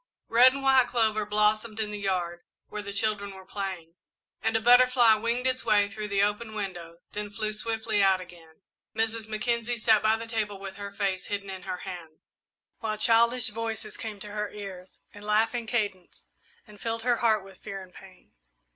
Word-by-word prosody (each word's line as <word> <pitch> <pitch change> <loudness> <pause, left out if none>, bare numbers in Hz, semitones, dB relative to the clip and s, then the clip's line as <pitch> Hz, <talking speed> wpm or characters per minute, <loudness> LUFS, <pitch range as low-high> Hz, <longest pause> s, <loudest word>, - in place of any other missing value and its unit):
Red 245 +3 +7
and 275 0 -5
white 265 -2 +5
clover 220 -3 +1
blossomed 215 +1 +1
in 210 -1 -1
the 210 - -5
yard, 180 -3 -2 0.3
where 210 - -5
the 200 -1 -6
children 200 -1 -1
were 190 0 -12
playing, 185 -4 -5 0.5
and 225 0 0
a - - +4
butterfly 245 0 +6
winged 235 +3 0
its 255 0 0
way 205 -1 +3
through 215 0 -5
the 200 -1 +2
open 215 +2 -1
window, 175 -5 -5
then 210 0 -4
flew 215 0 -3
swiftly 220 -1 0
out 190 -1 +4
again. 175 -1 -14 0.3
Mrs. 225 0 -1
Mackenzie 235 +2 -1
sat 220 -1 +4
by 220 +1 +3
the 230 - -6
table 220 -3 -2
with 195 0 -8
her 200 0 -6
face 195 -2 -2
hidden 200 -1 -4
in 190 0 -8
her 180 - -4
hands, 170 -4 -8 0.6
while 215 -1 -2
childish 235 +2 +4
voices 225 0 -4
came 215 -2 -6
to 210 - -5
her 210 0 -3
ears 190 -3 -10
in 205 - -12
laughing 225 +3 +1
cadence 205 -6 -3 0.4
and 210 -2 -16
filled 230 0 -2
her 245 -1 +2
heart 220 -4 +2
with 195 0 -15
fear 195 - -6
and 185 -1 -16
pain. 185 -1 -16
210 Hz, 190 wpm, -27 LUFS, 195-225 Hz, 0.6 s, Red